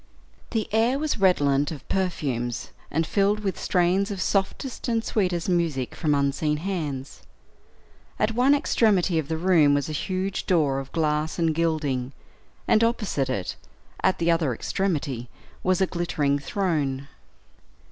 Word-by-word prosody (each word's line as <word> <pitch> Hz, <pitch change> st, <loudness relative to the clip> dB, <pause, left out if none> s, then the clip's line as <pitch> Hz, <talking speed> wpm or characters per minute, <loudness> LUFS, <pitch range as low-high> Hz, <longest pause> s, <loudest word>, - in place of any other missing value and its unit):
The 220 Hz, -2 st, -1 dB
air 230 Hz, +4 st, +3 dB
was 300 Hz, -5 st, -1 dB
redolent 145 Hz, -7 st, +3 dB
of 150 Hz, -4 st, -8 dB
perfumes, 140 Hz, -11 st, -2 dB, 0.2 s
and 160 Hz, +2 st, 0 dB
filled 200 Hz, +4 st, +1 dB
with 195 Hz, -2 st, -2 dB
strains 185 Hz, +2 st, +2 dB
of 200 Hz, -2 st, -4 dB
softest 200 Hz, +9 st, -1 dB
and 230 Hz, -2 st, +1 dB
sweetest 180 Hz, -5 st, 0 dB
music 165 Hz, -8 st, 0 dB
from 150 Hz, -2 st, +1 dB
unseen 140 Hz, +2 st, +1 dB
hands. 150 Hz, -6 st, -4 dB, 1.0 s
At 215 Hz, +1 st, +1 dB
one 255 Hz, +5 st, +4 dB
extremity 195 Hz, -, +2 dB
of 150 Hz, -, -3 dB
the 160 Hz, -, -2 dB
room 160 Hz, -5 st, +4 dB
was 145 Hz, +1 st, -1 dB
a 155 Hz, -, -3 dB
huge 190 Hz, +1 st, -2 dB
door 150 Hz, -7 st, +2 dB
of 135 Hz, 0 st, -8 dB
glass 155 Hz, -1 st, 0 dB
and 165 Hz, -2 st, +2 dB
gilding; 150 Hz, -6 st, -1 dB, 0.5 s
and 220 Hz, -, +4 dB
opposite 210 Hz, -, 0 dB
it, 100 Hz, -8 st, -2 dB, 0.5 s
at 190 Hz, 0 st, +2 dB
the 170 Hz, 0 st, +2 dB
other 160 Hz, -7 st, +1 dB
extremity, 140 Hz, -, -2 dB, 0.3 s
was 185 Hz, 0 st, +1 dB
a -, -, +5 dB
glittering 150 Hz, -6 st, 0 dB
throne. 145 Hz, -7 st, -1 dB
165 Hz, 145 wpm, -25 LUFS, 145-195 Hz, 1.0 s, a